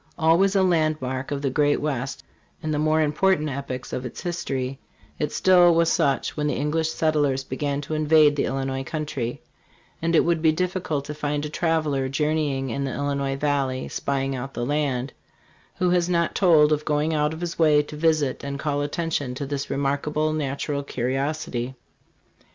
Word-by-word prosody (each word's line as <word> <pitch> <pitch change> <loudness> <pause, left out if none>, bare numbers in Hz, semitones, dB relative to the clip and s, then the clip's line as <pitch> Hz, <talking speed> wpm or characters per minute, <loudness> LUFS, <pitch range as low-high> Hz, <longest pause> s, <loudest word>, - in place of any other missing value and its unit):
Always 175 +5 +3
a 195 - +4
landmark 155 -7 0
of 145 -1 -3
the 135 - 0
great 145 +2 +2
West 135 -3 -3 0.4
in 155 - -2
the 150 - 0
more 155 +1 +3
important 155 +1 +2
epochs 130 -2 -5
of 125 - -3
its 125 - -7
history, 135 -6 -3 0.4
it 150 -1 -1
still 175 -2 +5
was 165 0 +3
such 145 -5 +1
when 150 -1 -1
the 150 - 0
English 155 +2 0
settlers 145 -4 +1
began 140 +2 -2
to 150 - -6
invade 155 -1 +4
the 145 - 0
Illinois 135 0 -2
country; 140 -5 -4 0.6
and 165 +1 +1
it - - +6
would 170 -1 +1
be 160 -1 +5
difficult 175 -4 -2
to 150 - -5
find 150 0 -2
a - - -4
traveler 155 -5 0
journeying 145 -2 0
in 140 +4 -2
the 135 - -3
Illinois 140 -1 -1
valley 135 -2 -1
"spying 135 -1 -2
out 135 +2 -6
the 120 - -2
land," 140 -2 -1 0.6
who 180 -1 +1
has 175 -1 +2
not 170 -1 +1
told 155 -5 +5
of 150 0 +1
going 150 +1 0
out 150 0 +1
of 160 +1 -7
his 170 -1 -4
way 150 -2 +5
to 150 - -10
visit 155 -4 +1
and 140 0 -4
call 145 -1 -1
attention 145 -3 -2
to 140 - -4
this 140 0 -4
remarkable 150 +2 0
natural 140 -1 -2
curiosity. 130 -1 -2
150 Hz, 180 wpm, -24 LUFS, 135-155 Hz, 0.6 s, it